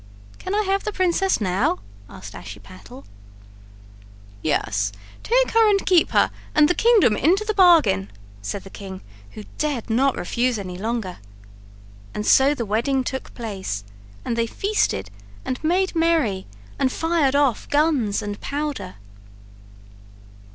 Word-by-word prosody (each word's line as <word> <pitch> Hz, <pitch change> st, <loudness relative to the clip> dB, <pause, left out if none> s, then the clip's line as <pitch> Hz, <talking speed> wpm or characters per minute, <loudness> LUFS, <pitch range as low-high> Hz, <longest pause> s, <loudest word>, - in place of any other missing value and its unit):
"Can 375 Hz, -, -3 dB
I 425 Hz, -, +2 dB
have 390 Hz, 0 st, 0 dB
the 425 Hz, -, -2 dB
princess 375 Hz, 0 st, +1 dB
now?" 215 Hz, -, +1 dB, 0.3 s
asked -, -, -10 dB
Ashiepattle 100 Hz, 0 st, -11 dB, 1.4 s
"Yes, 100 Hz, -9 st, 0 dB, 0.3 s
take -, -, +2 dB
her 450 Hz, -1 st, +5 dB
and 395 Hz, -1 st, +2 dB
keep 360 Hz, -4 st, +4 dB
her -, -, +3 dB, 0.2 s
and 300 Hz, 0 st, +6 dB
the 355 Hz, -, +2 dB
kingdom 435 Hz, -, +4 dB
into 370 Hz, -, +2 dB
the 430 Hz, -, 0 dB
bargain," 335 Hz, -, +4 dB, 0.3 s
said 190 Hz, -, -5 dB
the 195 Hz, -, -12 dB
king, 190 Hz, -2 st, -8 dB, 0.3 s
who 215 Hz, -, -8 dB, 0.2 s
dared 280 Hz, -7 st, -2 dB
not 265 Hz, +4 st, +2 dB
refuse 240 Hz, +6 st, 0 dB
any 185 Hz, -3 st, -6 dB
longer. 215 Hz, -2 st, -4 dB, 1.0 s
And 210 Hz, -, -3 dB
so 275 Hz, +2 st, +5 dB
the 235 Hz, -, -3 dB
wedding 235 Hz, +6 st, 0 dB
took 265 Hz, +1 st, -5 dB
place 195 Hz, -, -5 dB, 0.4 s
and 235 Hz, -, -1 dB
they 230 Hz, 0 st, 0 dB
feasted 390 Hz, -, -1 dB, 0.3 s
and 255 Hz, -, -4 dB
made 365 Hz, +3 st, +1 dB
merry 320 Hz, -, +1 dB, 0.3 s
and 260 Hz, -, +2 dB
fired 325 Hz, -4 st, +1 dB
off 280 Hz, -5 st, +1 dB
guns 290 Hz, -9 st, +1 dB
and 205 Hz, 0 st, -6 dB
powder. 280 Hz, -10 st, -4 dB
260 Hz, 135 wpm, -22 LUFS, -, 1.4 s, and